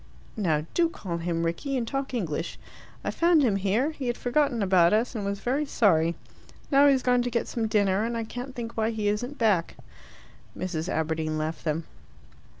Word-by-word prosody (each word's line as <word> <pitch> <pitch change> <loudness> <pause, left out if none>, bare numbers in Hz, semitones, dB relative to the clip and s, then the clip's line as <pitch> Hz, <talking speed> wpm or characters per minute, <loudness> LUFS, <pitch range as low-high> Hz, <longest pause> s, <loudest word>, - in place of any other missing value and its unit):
"Now, 160 -8 0
do 340 -1 +3
call 180 - -5
him 165 0 -1
Rickie, 260 +12 -2
and 235 -2 -2
talk 275 +2 -3
English. 165 -6 -3 0.5
I - - -1
found 335 -3 +4
him 215 -6 +2
here. 210 +10 +1
He 280 -5 -5
had 240 - -1
forgotten 245 -3 +1
about 185 -2 +4
us, 225 +4 +1
and 215 -4 -3
was 200 0 -3
very 265 +7 0
sorry. 170 -9 +3 0.6
Now 280 +1 +6
he's 270 -2 +3
gone 250 -1 +3
to 245 - -1
get 235 -1 -1
some 225 -2 -2
dinner, 205 -1 +2
and 230 +1 -2
I 230 - -2
can't 245 +4 -7
think 235 -1 -6
why 220 0 +1
he 220 -2 -2
isn't 245 +7 -2
back." 205 -8 +1 0.8
Mrs. 175 -1 -3
Aberdeen 160 -1 -1
left 155 +1 -3
them. 160 +1 0
220 Hz, 190 wpm, -27 LUFS, 170-245 Hz, 0.8 s, Now